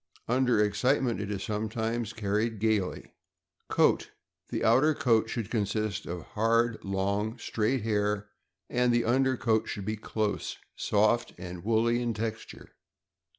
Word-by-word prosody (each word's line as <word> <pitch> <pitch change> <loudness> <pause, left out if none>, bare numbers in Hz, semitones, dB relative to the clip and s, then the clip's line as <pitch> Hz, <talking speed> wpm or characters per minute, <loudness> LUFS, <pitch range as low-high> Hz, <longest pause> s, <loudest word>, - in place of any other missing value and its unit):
Under 125 -2 +2
excitement, 115 +3 +2
it 105 - -4
is 100 -2 -3
sometimes 110 +1 -2
carried 110 +1 -1
gaily. 110 -3 -1 0.6
Coat. - - +3 0.2
— - - -44
The - - -2
outer 135 +7 +4
coat 115 -7 +2
should 115 -4 -4
consist 105 -1 -1
of 85 -1 -5
hard, 115 +1 +1
long, 100 +4 -1
straight 115 +1 -1
hair, 105 -1 0 0.4
and 125 0 +2
the 120 0 +2
under 130 +2 +2
coat 110 0 +1
should 100 - -5
be 110 +1 -2
close, 105 0 -2 0.2
soft, 110 +3 +2
and 90 -1 -7
woolly 115 +2 +2
in 120 -2 -1
texture. 110 +1 -5
110 Hz, 140 wpm, -29 LUFS, 105-120 Hz, 0.6 s, outer